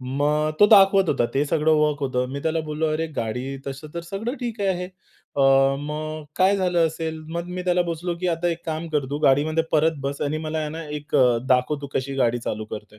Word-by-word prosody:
मग 145 +4 0
तो 205 - +9
दाखवत 195 -3 +6
होता. 135 -5 +2
ते 140 - +2
सगळं 160 +1 +2
वर्क 150 -1 +1
होतं. 125 -2 -1
मी 140 - -4
त्याला 160 0 0
बोललो, 155 0 -2
"अरे, 160 +1 -1
गाडी 125 +4 -3
तसं 140 +3 -6
तर 170 - -3
सगळं 220 +6 -3
ठीक 235 -3 -4
आहे. 180 -2 0 0.5
अ, 140 - +1 0.4
मग 155 +1 -5
काय 195 +2 +4
झालं 180 -3 +2
असेल?" 160 0 -4 0.2
मग 170 0 -3
मी 180 - -3
त्याला 180 0 +2
बोललो 170 +1 -3
की, 180 - -1
"आता 170 +1 0
एक 170 0 -5
काम 160 +1 -3
कर, 150 -3 0
तू 145 - -2
गाडीमध्ये 155 +4 +3
परत 160 +1 +3
बस, 140 +1 -3
आणि 150 +2 -1
मला 155 0 -3
आहे 155 -1 -2
ना, 165 +1 -6
एक 150 0 -3 0.3
दाखव 130 +3 +2
तू - - -4
कशी 135 +1 -2
गाडी 120 -2 +2
चालू 110 0 -3
करतोय." 105 0 -9
155 Hz, 215 wpm, -23 LUFS, 140-170 Hz, 0.5 s, तो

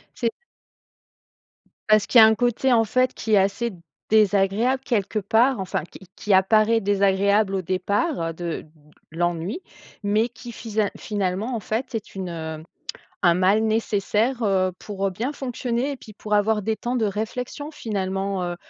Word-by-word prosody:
C'est 230 -2 0 1.6
parce 215 -1 +4
qu'il 245 - +6
y - - +11
a - - +10
un 220 - +3
côté 245 +2 +1
en 225 - +5
fait 255 +4 +1
qui 220 - -3
est 205 - +7
assez 200 +3 +1 0.4
désagréable 215 +4 +3
quelque 215 -4 0
part, 225 +4 +2
enfin 185 -4 -2
qui - - -14 0.2
qui 210 - 0
apparaît 215 +4 +4
désagréable 200 0 +2
au 190 - 0
départ 185 - -1
de 170 0 -5 0.5
l'ennui, 175 - -2 0.4
mais 215 +4 +1
qui 240 0 -10
fisa 215 -2 -2
finalement 205 +3 -2
en - - -2
fait 230 +6 -3
est 220 - -6
une, 190 -2 -4
heu, 160 -2 -6 0.6
un 175 - +6
mal 190 +4 +3
nécessaire, 220 +2 0
heu, 190 -2 +2
pour, 195 -2 -4
heu, 195 - -2
bien 235 +9 -3
fonctionner 250 0 -2
et 275 - -5
puis 215 - -13
pour 210 +1 -5
avoir 210 +1 +2
des 220 +2 0
temps 245 +1 -3
de 225 -3 +1
réflexion, 230 +8 -4
finalement, 195 - -2
heu, 175 0 -3
210 Hz, 165 wpm, -23 LUFS, 195-230 Hz, 1.6 s, y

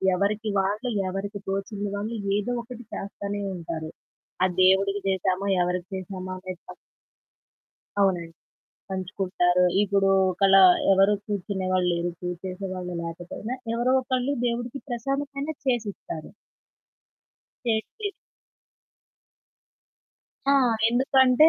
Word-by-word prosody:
ఎవరికి 210 +3 0
వాళ్ళు 210 +6 0 0.2
ఎవరికి 200 +2 -4
తోచింది 200 +1 -2
వాళ్ళు 215 +3 -3 0.2
ఏదో 210 +4 -1
ఒకటి 240 0 -9
చేస్తానే 200 +1 -4
ఉంటారు. 165 -2 -5 0.5
ఆ - - +7 0.2
దేవుడికి 195 +2 +4
చేసామా 190 0 +1
ఎవరికి 180 0 -1
చేశామా 185 0 -6
అనేది 185 -1 -7
ప - - -8 1.3
అవునండి 175 -4 +2 0.6
పంచుకుంటారు. 185 -1 +1 0.2
ఇప్పుడు 200 -1 +2 0.2
ఒకలా 195 +1 +6 0.3
ఎవరు 195 +2 +5
కూర్చునేవాళ్ళు 185 -2 0
లేరు. 170 +1 0
పూజ 180 0 -2
చేసేవాళ్ళు 185 -1 -4
లేకపోయినా 175 +8 -5 0.2
ఎవరో 245 +2 +2
ఒకళ్ళు 255 +1 0
దేవుడికి 240 +3 -2
ప్రసాదమైనా 275 +5 -2
చేసిస్తారు. 210 -10 -2 1.4
చేసి 240 - -1 2.4
ఆ! - - +6 0.4
ఎందుకంటే 260 +3 +5
200 Hz, 95 wpm, -26 LUFS, 185-235 Hz, 2.4 s, ఆ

